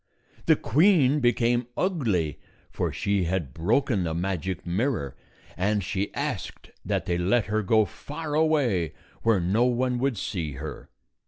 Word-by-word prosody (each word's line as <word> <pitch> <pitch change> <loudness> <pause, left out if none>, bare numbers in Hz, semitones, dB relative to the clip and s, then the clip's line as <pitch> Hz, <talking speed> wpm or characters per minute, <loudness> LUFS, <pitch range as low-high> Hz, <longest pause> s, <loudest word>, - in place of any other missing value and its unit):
The - - +7
queen 150 - +4
became 120 -1 +2
ugly, 105 - 0 0.3
for - - -1
she 100 -2 0
had 85 -7 -2
broken 105 - +1
the 80 -2 -2
magic 95 0 -3
mirror, 90 - -1 0.4
and 100 +2 0
she 95 +3 -2
asked - - -4
that - - -1
they 85 0 0
let 100 +6 +2
her 110 +1 0
go 110 +2 +3
far 150 +7 -7
away, 145 - +2 0.3
where 115 -4 +3
no 100 +8 +2
one 125 0 +1
would 130 -3 0
see 85 -7 -3
her. 75 +4 -7
105 Hz, 145 wpm, -26 LUFS, 90-125 Hz, 0.4 s, The